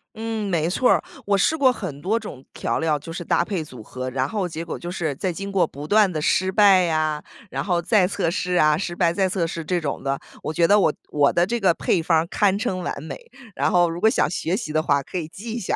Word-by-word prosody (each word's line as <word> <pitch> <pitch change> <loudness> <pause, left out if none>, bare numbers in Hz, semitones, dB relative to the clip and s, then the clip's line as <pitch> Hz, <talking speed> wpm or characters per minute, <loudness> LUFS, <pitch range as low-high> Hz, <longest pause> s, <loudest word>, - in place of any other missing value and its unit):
嗯， 220 -2 -3
没 165 -2 +1
错 250 +7 +2
儿。 - - +2 0.2
我 200 -1 +2
试 315 +11 +2
过 265 -4 +4
很 160 - -6
多 220 +6 0
种 140 - -9
调 - - -2
料， 160 -2 +1
就 165 +3 -9
是 175 - -5
搭 170 - +1
配 185 -6 -2
组 125 -7 -11
合。 130 +3 -6
然 130 +1 -1
后 200 -1 -2
结 165 +1 -6
果 - - -5
就 175 - -6
是， 160 -5 -2
在 185 +5 -2
经 195 +3 -6
过 185 -4 +2
不 145 +1 -9
断 210 -2 +4
的 155 - -3
失 185 +4 +1
败 195 -2 +6
呀， 155 -2 0 0.3
然 - - -2
后 180 -3 +1
再 190 0 +3
测 185 -3 -1
试 180 0 -1
呀， 155 -2 +4
失 175 -2 -4
败 170 -2 +2
再 190 0 +1
测 180 -2 0
试 165 0 -5
这 175 +2 0
种 145 -4 -4
的， 135 0 -1 0.2
我 - - -3
觉 170 +1 +3
得 205 +3 +5
我 160 -6 +3 0.2
我 145 -1 +3
的 175 +1 +2
这 235 +4 -2
个 185 -4 +3
配 170 - +1
方 160 -1 +3
儿 165 - -2
堪 200 0 +2
称 190 -3 -2
完 145 -4 -4
美。 160 - -6 0.4
然 - - +1
后 175 -1 +4
如 170 +1 -5
果 220 - +5
想 - - +2
学 180 +1 -1
习 155 -10 -5
的 155 - +2
话， 140 -2 +1
可 185 - -6
以 160 -3 -3
记 220 +7 -8
一 240 - -3
下。 185 - -1
175 Hz, 290 characters per minute, -23 LUFS, 155-195 Hz, 0.4 s, 败